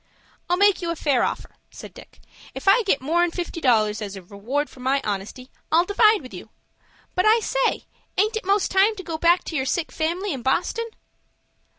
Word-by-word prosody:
"I'll 355 - +2
make 405 0 +4
you 340 - -3
a 335 - -1
fair 285 -5 +1
offer," - - -3
said - - -11
Dick. - - -16 0.3
"If - - -8
I 395 +5 +6
get 385 - 0
more'n 345 +4 +2
fifty 340 -1 -5
dollars 215 -5 +2
as 200 -1 -5
a 190 - -9
reward 230 +11 -3
for - - -17
my 265 +2 +1
honesty, 210 +5 -5 0.2
I'll 335 +2 +4
divide 425 -1 +3
with 255 - -11
you. 185 +4 -10 0.6
But 365 +3 +1
I 445 +2 +5
say, - - -1 0.3
aint 430 +4 +2
it 440 - -3
most 395 +1 +1
time 395 +3 +3
to 380 - -8
go 320 -2 -5
back 345 +2 +3
to 320 - -6
your 265 -3 -1
sick 330 +4 -1
family 345 +4 -2
in 265 - -6
Boston?" 360 - -1
335 Hz, 205 wpm, -23 LUFS, 260-395 Hz, 0.6 s, I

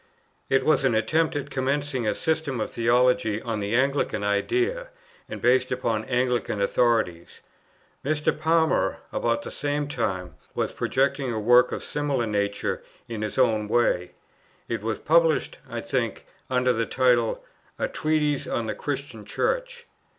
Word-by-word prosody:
It 135 - +2
was 155 - +3
an 130 -4 +3
attempt 155 +9 +1
at 145 -1 -4
commencing 135 -2 -1
a - - +1
system 160 -6 -1
of - - -2
theology 120 -2 +2
on 115 -2 -3
the 100 +2 -1
Anglican 135 -4 +1
idea, 370 - 0 0.4
and - - -6
based 125 +1 +3
upon 115 -4 -1
Anglican 125 -4 0
authorities. 100 -5 0 0.6
Mr. 150 +1 +1
Palmer, 160 +1 +2
about 115 0 0
the - - -7
same 145 0 -2
time, 95 - -3 0.2
was - - -1
projecting 135 -1 0
a 110 - -2
work 120 +3 +5
of - - -4
a - - -7
similar 145 -5 -1
nature 100 -1 -1 0.3
in 115 -2 -5
his 105 -1 -4
own 110 -5 +2
way. 90 -6 +1 0.5
It 115 -2 -3
was 110 0 -2
published, 165 0 +2
I - - -4
think, - - -2 0.2
under 125 -1 +2
the 115 0 -1
title, 125 -3 +2 0.3
"A - - 0
Treatise 150 -2 0
on 120 - -1
the 110 - -2
Christian 140 -6 -5
Church." 485 - -2
125 Hz, 150 wpm, -25 LUFS, 110-145 Hz, 0.6 s, work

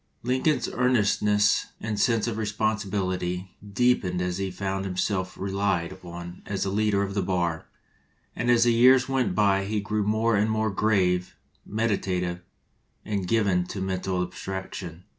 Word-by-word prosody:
Lincoln's 130 +5 +1
earnestness 105 -4 +2
and 105 -2 -3
sense 115 +1 +2
of 115 -2 -3
responsi 110 -1 -1
bility 90 -2 -2
deepened 100 -3 +1
as 90 0 -2
he 95 -1 -1
found 95 +1 -3
himself 95 0 -2
relied 95 -3 -1
upon 85 -1 -9
as 100 -1 -2
a 95 - -1
leader 105 -1 +2
of 100 0 -3
the 100 - 0
bar; 85 -4 -1 0.7
and 120 - -1
as 120 -1 +5
the 120 -1 +4
years 125 +2 +6
went 130 -8 0
by 100 -2 +3
he 105 +1 -1
grew 105 +1 -1
more 110 +2 +2
and 105 +2 +2
more 110 -1 0
grave, 95 -4 +1 0.3
meditative, 95 -5 -1 0.6
and 100 -4 -2
given 100 -4 +2
to 100 - -5
mental 95 -1 -1
abstraction. 90 -2 -6
100 Hz, 150 wpm, -26 LUFS, 90-110 Hz, 0.7 s, years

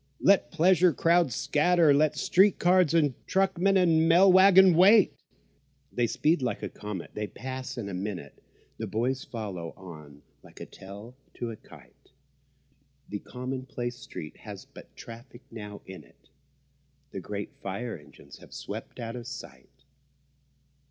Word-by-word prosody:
let 200 0 +3
pleasure 180 +1 +4
crowds 165 -3 +2
scatter, 165 0 +3
Let 150 +1 +2
street 195 +1 +3
car 180 +2 +3
and 155 -5 +2
truckman 195 0 +2
and 165 -3 +3
mail 185 +3 +6
waggon 190 -1 +7
wait. 195 +5 +6 0.8
They 120 -1 +1
speed 155 +6 +1
like 125 - -3
a - - -3
comet—they 105 +1 -6
pass 130 +4 -7
in 110 -4 -5
a 100 - -6
minute; 90 -6 -6 0.4
The - - -4
boys 125 +4 -2
follow 95 -8 -7
on 75 -6 -13 0.2
like - - -17
a - - -7
tail 100 +6 -12 0.2
to 120 -1 -5
a - - -7
kite; - - -19 1.0
The 105 - -4
commonplace 125 -1 -6
street 75 - -9
has - - -10
but - - -16
traffic 120 +2 -12
now 105 -2 -9
in 95 0 -10
it— - - -26 0.8
The - - -6
great 100 -1 -6
fire 110 +5 -5
engines 75 -1 -15
have - - -16
swept - - -8
out 115 0 -5
of 120 -1 -8
sight. 125 0 -11
125 Hz, 145 wpm, -27 LUFS, 105-170 Hz, 1.0 s, waggon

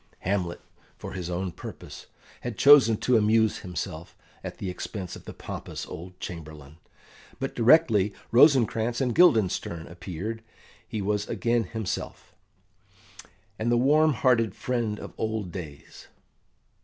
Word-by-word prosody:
Hamlet, 90 -2 -2 0.4
for - - -8
his 90 -2 -5
own 90 +1 -2
purpose, - - -10 0.3
had 120 -3 -6
chosen 140 -6 +7
to 125 +2 +2
amuse 110 0 +3
himself 85 -2 -6 0.3
at - - -7
the 100 - -5
expense 90 0 -5
of - - -13
the - - -7
pompous - - -7
old 90 +2 -10
Chamberlain, 80 -5 -9 0.6
but 135 0 -3
directly 115 -5 +4 0.2
Rosencrantz 120 -3 +4
and 125 -3 0
Guildenstern 110 - +3
appeared 95 +6 -6 0.5
he 105 -2 -4
was 105 +1 -1
again 115 -1 0
himself, 110 +1 -5 1.3
and 115 +2 0
the 120 - +4
warm 150 +5 +4
hearted 115 -4 +2
friend 115 -4 -2
of - - -9
old 110 -4 -2
days. 80 -6 -9
110 Hz, 130 wpm, -26 LUFS, 90-120 Hz, 1.3 s, chosen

